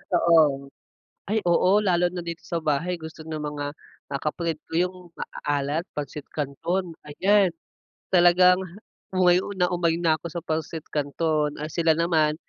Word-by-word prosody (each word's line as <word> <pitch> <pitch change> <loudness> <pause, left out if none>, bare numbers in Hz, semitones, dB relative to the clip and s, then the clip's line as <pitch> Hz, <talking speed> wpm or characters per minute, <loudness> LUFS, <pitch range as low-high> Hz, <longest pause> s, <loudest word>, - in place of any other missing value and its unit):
Oo. 150 -5 +3 0.6
Ay 220 +2 +1
oo 185 +4 +4
lalo 180 -2 +3
na 180 - -5
dito 170 -1 -6
sa 170 - -3
bahay 155 +4 0
gusto 160 0 -9
ng 155 -1 -5
mga, 145 -1 -4 0.5
ah, 140 - -2
kapatid 160 +1 -2
ko - - -12
yung 185 - -13 0.2
maaalat 145 +3 -2
Pancit 150 0 -5
Canton 165 +5 -3
ayan. 190 +5 +3 0.6
Talagang, 180 +1 +6 0.5
umay 180 -1 +4 0.2
na 180 -1 +2
umay 170 -2 +1
na 160 -2 +2
ko 170 - -6
sa 170 - -4
Pancit 160 -1 -3
Canton, 150 0 0
ah, 150 - -3
sila 165 -1 +2
naman, 160 -2 +2
165 Hz, 150 wpm, -25 LUFS, 150-175 Hz, 0.6 s, Talagang